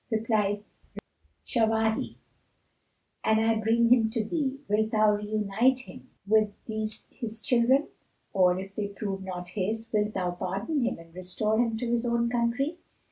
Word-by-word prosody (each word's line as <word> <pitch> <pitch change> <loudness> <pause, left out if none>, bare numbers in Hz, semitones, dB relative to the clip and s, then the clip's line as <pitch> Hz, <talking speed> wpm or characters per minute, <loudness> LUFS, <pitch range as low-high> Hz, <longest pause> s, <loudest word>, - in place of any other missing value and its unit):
Replied 215 -3 +1 0.8
Shawahi, 220 -1 +1 1.1
"An 220 - +3
I 225 +1 +3
bring 230 +2 +3
him 235 -3 +5
to 220 -1 -1
thee, 275 +1 -1
wilt 215 +1 +2
thou 215 -1 +4
reunite 215 +4 +1
him - - -13 0.2
with 215 +1 +4 0.2
these 220 -1 -4
his 225 -3 -6
children? 260 +3 +3 0.4
Or, 180 -2 +4
if 195 +1 -8
they 205 0 -2
prove 200 -1 -4
not 180 -2 -6
his, 215 +4 -3
wilt 210 0 +1
thou 180 -2 0
pardon 195 - -2
him 240 - 0
and 165 0 -15
restore 185 +5 -1
him 230 -2 +1
to 245 - -3
his 240 0 +1
own 235 0 +1
country?" 245 +7 0
220 Hz, 150 wpm, -28 LUFS, 205-235 Hz, 1.1 s, him